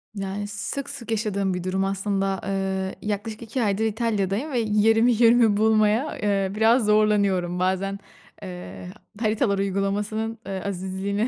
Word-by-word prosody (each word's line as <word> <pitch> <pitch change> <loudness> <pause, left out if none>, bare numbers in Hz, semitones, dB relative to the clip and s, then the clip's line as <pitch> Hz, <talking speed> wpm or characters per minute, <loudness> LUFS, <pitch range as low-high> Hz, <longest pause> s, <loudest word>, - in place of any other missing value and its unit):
Yani, 200 +1 -4
sık 210 +7 -5
sık 240 -5 -6
yaşadığım 200 -3 0
bir 180 -1 -4
durum 190 +1 0
aslında. 195 0 -1
Eee, 190 -1 -2
yaklaşık 210 +1 -4
2 230 +2 -2
aydır 210 +1 +1
İtalya'dayım 220 +3 -1
ve 245 - +1
yerimi 225 +2 +3
yönümü 230 -2 +5
bulmaya, 220 +5 +2
eee, 195 -2 0
biraz 225 +2 +4
zorlanıyorum. 200 -4 +2
Bazen, 190 +2 0 0.4
eee, 95 - -8 0.3
haritalar 215 -2 +1
uygulamasının, 205 +3 -1
ııı, 190 -1 -4
azizliğine 195 +3 -2
205 Hz, 135 wpm, -24 LUFS, 195-220 Hz, 0.4 s, yönümü